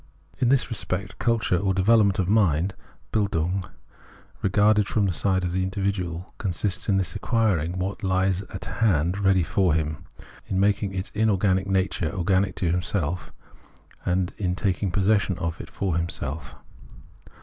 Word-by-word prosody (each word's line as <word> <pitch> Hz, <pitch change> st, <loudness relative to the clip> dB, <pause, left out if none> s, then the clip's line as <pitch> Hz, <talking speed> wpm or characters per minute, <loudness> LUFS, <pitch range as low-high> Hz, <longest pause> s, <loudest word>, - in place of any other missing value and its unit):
In 125 Hz, -, +2 dB
this 130 Hz, -2 st, +2 dB
respect 95 Hz, -3 st, -3 dB
culture 115 Hz, -6 st, +1 dB
or 95 Hz, +1 st, 0 dB
development 100 Hz, +1 st, +4 dB
of 95 Hz, -3 st, 0 dB
mind 95 Hz, -3 st, +2 dB, 0.4 s
(Bildung), 95 Hz, -3 st, 0 dB, 0.8 s
regarded 105 Hz, +1 st, +3 dB
from 105 Hz, -1 st, +1 dB
the 95 Hz, -, 0 dB
side 95 Hz, +2 st, +1 dB
of 90 Hz, -1 st, -2 dB
the 95 Hz, -, 0 dB
individual, 95 Hz, -2 st, -3 dB
consists 95 Hz, 0 st, -2 dB
in 95 Hz, -, +3 dB
his 95 Hz, -2 st, -1 dB
acquiring 95 Hz, -, 0 dB
what 95 Hz, +2 st, -3 dB
hes 95 Hz, -1 st, +1 dB
at 95 Hz, 0 st, -7 dB
his 100 Hz, -, -6 dB
hand 90 Hz, -4 st, +2 dB
ready 95 Hz, -2 st, +3 dB
for 90 Hz, 0 st, +2 dB
him, 80 Hz, -2 st, -2 dB, 0.4 s
in 95 Hz, -, -1 dB
making 100 Hz, 0 st, +1 dB
its 95 Hz, 0 st, -4 dB
inorganic 100 Hz, -3 st, +2 dB
nature 95 Hz, -4 st, 0 dB
organic 95 Hz, 0 st, +1 dB
to 85 Hz, -3 st, 0 dB
himself, 90 Hz, -1 st, -2 dB, 0.7 s
and 90 Hz, 0 st, 0 dB, 0.2 s
taking 100 Hz, -1 st, 0 dB
possession 100 Hz, 0 st, +1 dB
of 85 Hz, -2 st, -3 dB
it -, -, -11 dB
for 95 Hz, -4 st, -2 dB
himself. 80 Hz, -3 st, -2 dB
95 Hz, 150 wpm, -25 LUFS, 90-100 Hz, 0.8 s, development